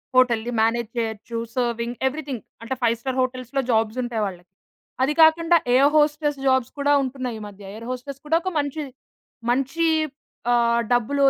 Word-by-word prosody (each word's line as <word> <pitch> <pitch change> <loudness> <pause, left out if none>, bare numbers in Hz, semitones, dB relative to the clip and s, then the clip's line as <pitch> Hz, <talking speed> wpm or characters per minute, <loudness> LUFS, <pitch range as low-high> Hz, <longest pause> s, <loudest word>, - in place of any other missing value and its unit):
హోటల్‌ని 240 -2 +3
manage 230 0 +1
చేయొచ్చు 225 0 -3 0.2
serving 235 -1 -1
everything. 275 -4 -4 0.2
అంటే 230 +3 -3
five 230 -1 +3
star 260 -1 -3
హోటల్స్‌‌లో 255 +1 -2
జాబ్స్ 225 +1 +1
ఉంటాయి 235 -3 -2
వాళ్ళకి. 180 -2 -7 0.5
అది 295 +3 +2
కాకుండా 330 +2 +6 0.2
ఎయిర్ 275 +3 +6
హోస్టెస్ 295 -1 +2
జాబ్స్ 260 -2 +2
కూడా 285 +1 +2
ఉంటున్నాయి 255 -3 -4
ఈ - - -9
మధ్య. 200 0 -13
ఎయిర్ 230 +2 -8
హోస్టెస్ 255 +2 -5
కూడా 320 +2 +2
ఒక 370 +1 -2
మంచి, 290 +2 -2 0.7
మంచి 275 +6 +1 0.6
ఆహ్, 235 -1 +3
డబ్బులు 260 +4 +1
255 Hz, 155 wpm, -23 LUFS, 230-285 Hz, 0.7 s, కాకుండా